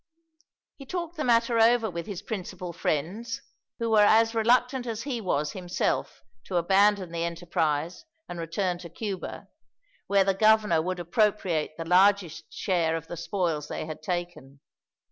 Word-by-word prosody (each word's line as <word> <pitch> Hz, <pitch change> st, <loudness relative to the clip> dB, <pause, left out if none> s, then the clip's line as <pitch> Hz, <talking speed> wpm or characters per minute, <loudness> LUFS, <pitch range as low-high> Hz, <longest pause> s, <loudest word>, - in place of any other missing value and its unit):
He 275 Hz, -, -11 dB
talked 345 Hz, 0 st, -4 dB
the 305 Hz, -, -3 dB
matter 230 Hz, -1 st, +3 dB
over 230 Hz, 0 st, +4 dB
with 170 Hz, -2 st, -5 dB
his 200 Hz, -4 st, -6 dB
principal 185 Hz, -4 st, -5 dB
friends, 175 Hz, +9 st, -2 dB, 0.4 s
who 230 Hz, -1 st, -2 dB
were 215 Hz, -1 st, +6 dB
as 225 Hz, +2 st, +5 dB
reluctant 245 Hz, +3 st, +2 dB
as 230 Hz, 0 st, -4 dB
he 255 Hz, -5 st, -3 dB
was, 150 Hz, -6 st, -1 dB
himself, 180 Hz, -10 st, -2 dB, 0.2 s
to 185 Hz, -, -5 dB
abandon 195 Hz, +1 st, +3 dB
the 170 Hz, 0 st, -2 dB
enterprise 170 Hz, -, -2 dB, 0.2 s
and 175 Hz, -, -7 dB
return 175 Hz, +2 st, -2 dB
to 175 Hz, -1 st, -9 dB
Cuba, 195 Hz, +1 st, -6 dB, 0.6 s
where 200 Hz, -1 st, +4 dB
the 195 Hz, 0 st, +2 dB
governor 215 Hz, -4 st, +4 dB
would 185 Hz, +2 st, -3 dB
appropriate 175 Hz, -4 st, 0 dB
the 165 Hz, -, -5 dB
largest 180 Hz, -2 st, +3 dB
share 170 Hz, -4 st, 0 dB
of 165 Hz, -1 st, -5 dB
the 175 Hz, -, -7 dB
spoils 165 Hz, -5 st, -2 dB
they -, -, -4 dB
had 155 Hz, 0 st, -7 dB
taken. 175 Hz, -7 st, -5 dB
185 Hz, 155 wpm, -27 LUFS, 170-220 Hz, 0.6 s, were